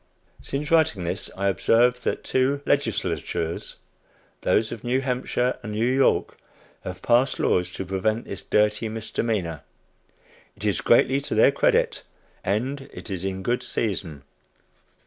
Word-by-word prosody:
Since 145 +3 -4
writing 160 - +3
this 85 - -3
I 100 +1 0
observe 120 +6 +3
that - - -2
two 135 +2 +1
legislatures 85 - -1 0.7
those 110 0 +2
of 115 - -7
New 125 +2 +1
Hampshire 125 -1 -1
and 105 -3 -6
New 110 +2 +1
York 130 +2 +2 0.4
have 90 0 -7
passed 125 +3 +3
laws 90 0 +1
to 95 - -5
prevent 110 +5 -1
this 100 - -6
dirty 105 +1 +1
misdemeanor. 110 -7 -2 1.0
It - - -6
is - - +1
greatly 135 +2 +4
to - - -3
their - - +6
credit, - - +2 0.4
and 130 +8 -2
it 110 - -9
is 95 -2 -4
in 95 0 -3
good 120 +3 0
season. 90 - -3
115 Hz, 140 wpm, -24 LUFS, 95-130 Hz, 1.0 s, their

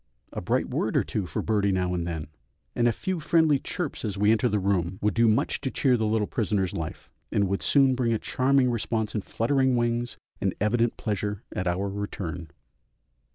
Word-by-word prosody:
A - - -4
bright - - 0
word - - -1
or - - +3
two 100 -4 -3
for 75 - -3
birdie 100 -2 +1
now 90 -1 0
and 85 -1 -2
then, 80 -3 -3 0.5
and 120 - +3
a - - +4
few 185 - -3
friendly 155 -2 +3
chirps 175 +1 -4
as 105 -3 -3
we 105 +2 +4
enter 115 +2 +3
the 105 - +1
room, 95 -2 0
would 105 -1 +1
do 115 +3 +4
much 110 0 +1
to 135 - -1
cheer 130 -1 +2
the 110 -2 0
little 110 -1 +1
prisoner's 100 -4 -1
life, 80 -2 -6 0.2
and 100 -1 +2
would 95 +1 -1
soon 135 -2 +4
bring 125 -2 0
a 115 - +2
charming 130 +2 +2
response 110 -2 -1
in 105 - -1
fluttering 130 +5 +1
wings 120 0 -1 0.2
and - - 0
evident 115 +3 +1
pleasure 105 -1 -3
at 90 - -1
our 90 +3 0
return. 95 -4 -5
110 Hz, 200 wpm, -26 LUFS, 95-120 Hz, 0.5 s, a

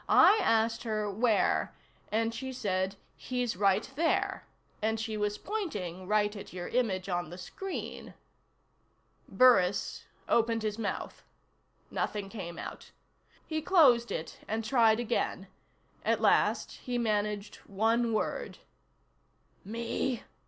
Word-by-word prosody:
"I 435 - +7
asked 225 -7 +2
her 215 -3 -2
where 220 +1 +2 0.4
and 225 +1 +1
she 260 +2 -5
said: 190 -5 -1 0.2
'He's 250 -3 -2
right 200 +2 +2
there.' 325 +3 0 0.3
And 220 +1 0
she 220 0 -3
was 210 0 -1
pointing 200 - -4
right 210 0 +2
at 200 - -9
your 180 -1 -5
image 200 -7 0
on 175 -3 -2
the 175 - -8
screen." 385 - -6 1.1
Burris 205 -7 +4 0.2
opened 230 -1 +2
his 215 0 -2
mouth. 210 -3 -4 0.7
Nothing 205 -2 -2
came 175 -6 -7
out. - - -8 0.6
He 315 -1 -2
closed 275 -9 +5
it 160 - -5
and 220 +1 -2
tried 225 -2 +4
again. 240 - -1 0.6
At - - +2
last - - +2
he 245 -1 -3
managed 210 -2 -1
one 225 +4 +1
word. 215 - -2 1.1
"Me?" 235 +3 -2
220 Hz, 120 wpm, -30 LUFS, 200-240 Hz, 1.1 s, I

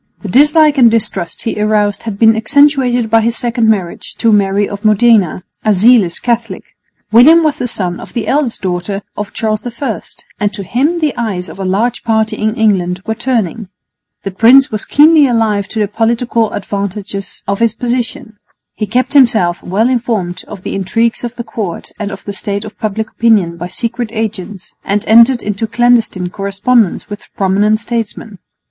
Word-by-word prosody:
The 205 - -5
dislike 295 - +4
and 240 -2 +7
distrust 210 -6 -2
he 220 -2 -3
aroused 210 -1 +1
had 220 -3 -6
been 225 +1 +5
accentuated 250 -1 +2
by 225 0 +4
his 230 +1 0
second 235 -2 0
marriage 190 -6 -2
to 230 - +1
Mary 200 -1 +2
of 200 +1 -8
Modena, 215 -4 +3 0.2
a 215 - +3
zealous 205 -3 +3
Catholic. 235 -1 -3 0.4
William 305 +9 +6
was 305 -2 0
the 245 - -2
son 180 -6 -3
of - - -11
the 235 - -3
eldest 275 -7 -1
daughter 185 +2 -3
of 210 -1 -5
Charles 215 -1 -2 0.2
I, 255 -7 -3 0.4
and 205 -1 0
to 200 - -6
him 290 - -1
the 300 -4 0
eyes 195 -6 -3
of - - -11
a - - -3
large 220 +6 -1
party 220 -1 0
in 215 +1 -1
England 190 -5 0
were 220 - -1
turning. 225 -4 -2 0.6
The 195 - -4
prince 245 +8 +5
was 215 -2 -3
keenly 300 0 +5
alive 220 -5 0
to 220 - -8
the 210 - +1
political 230 +1 0
advantages 200 0 -5
of 200 0 -1
his 230 -2 +1
position. 245 -1 -4 0.3
He 215 - -4
kept 250 +6 -1
himself 220 -11 +3
well 205 +6 0
informed 225 -8 -2
of 185 - -10
the - - -4
intrigues 225 +6 -1
of 240 0 -5
the 235 - -5
court 200 -8 -6
and 210 -2 -3
of 195 - -10
the 200 - -5
state 200 +1 -3
of 215 - -11
public 220 -1 -3
opinion 210 -7 +2
by 170 +1 -6
secret 235 +4 -3
agents, 210 -4 -5
and 205 +1 -1
entered 235 +3 +5
into 210 +2 -3
clandestine 225 -6 +1
correspondence 200 +2 0
with 205 0 -9
prominent 205 +3 +1
statesmen. 225 -3 -5
220 Hz, 180 wpm, -13 LUFS, 200-240 Hz, 0.6 s, and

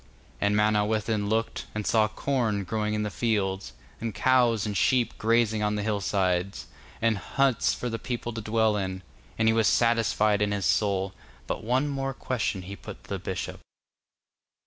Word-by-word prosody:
And 100 0 +2
Manawyddan 105 0 +1
looked, 115 +1 -1
and 105 -1 -2
saw 110 -2 +3
corn 110 -2 -1
growing 105 +2 -1
in 105 - -1
the 105 - -3
fields, 95 - -1 0.3
and 115 -2 -4
cows 120 -5 +3
and 105 -1 -3
sheep 120 +3 +2
grazing 110 -1 +2
on 105 0 +1
the 105 - -2
hill 105 -1 -1
side, 95 -1 0 0.5
and 115 -3 +2
huts 135 -1 +1
for 125 - -4
the 115 -1 -3
people 120 0 -4
to 115 - -4
dwell 110 0 +2
in. 95 -1 -3 0.3
And 110 - +2
he 110 - +5
was 110 -2 +3
satisfied 110 -3 +3
in 105 0 +1
his 100 -3 -1
soul, 95 +1 +1 0.3
but - - -4
one 130 +6 +1
more 135 -2 -2
question 110 -8 -2
he 100 +2 -7
put - - -10
to - - -18
the - - -2
bishop. - - -4
110 Hz, 175 wpm, -27 LUFS, 100-115 Hz, 0.5 s, he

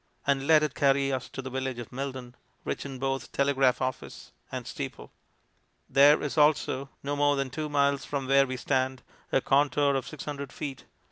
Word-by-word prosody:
and 140 -1 +1
let 155 -1 +6
it 150 - -1
carry 140 0 +2
us 130 -1 -3
to 135 - -7
the 130 - -5
village 130 -1 -3
of 120 -2 -8
Milden, 130 -2 -5 0.3
rich - - -3
in 135 -1 -7
both 135 +1 -3
telegraph 135 -2 +2
office 130 0 -5 0.2
and - - -5
steeple. - - -7 0.8
There 145 +2 +5
is 150 +1 -1
also, 145 -2 +2
no 145 +1 -2
more 145 0 +3
than 135 -2 -2
two 155 +2 -4
miles 140 -1 +2
from 140 -2 -3
where 135 0 +5
we 130 0 -4
stand, 130 0 -1 0.3
a 135 - +3
contour 140 +1 +3
of 135 -1 -2
600 145 -2 -6
ft. 135 +1 -7
140 Hz, 185 wpm, -28 LUFS, 130-145 Hz, 0.8 s, let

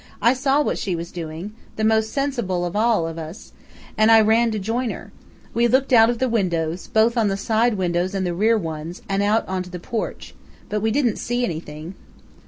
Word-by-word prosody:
"I 235 +3 +4
saw 275 +3 +2
what - - -1
she 185 -3 -2
was 170 +1 -6
doing 170 +4 -6 0.2
the 220 - -2
most 220 0 +2
sensible 240 -11 -1
of 175 - -4
all 215 -6 +2
of 165 0 -6
us 160 +5 -9 0.4
and 215 +1 +4
I 225 - +8
ran 225 +2 +4
to 215 - -2
join 225 +5 -1
her. - - -7 0.4
We 235 +1 +3
looked 260 +2 +2
out 225 -1 +7
of 240 - 0
the 260 +2 +1
windows, 175 -7 -1
both 225 +2 +3
the 210 -5 +1
side 220 +3 +1
windows 180 0 -1
and 190 -1 -1
the 175 - -1
rear 220 +6 +3
ones, 165 -1 -6
and 195 0 0
out 210 +2 +1
onto 185 -1 -3
the 180 0 -7
porch. 225 +5 -5 0.4
But 210 0 -1
we 220 - +1
didn't 240 -2 +1
see 245 +1 -1
anything." 160 -1 -6
210 Hz, 205 wpm, -22 LUFS, 175-235 Hz, 0.4 s, I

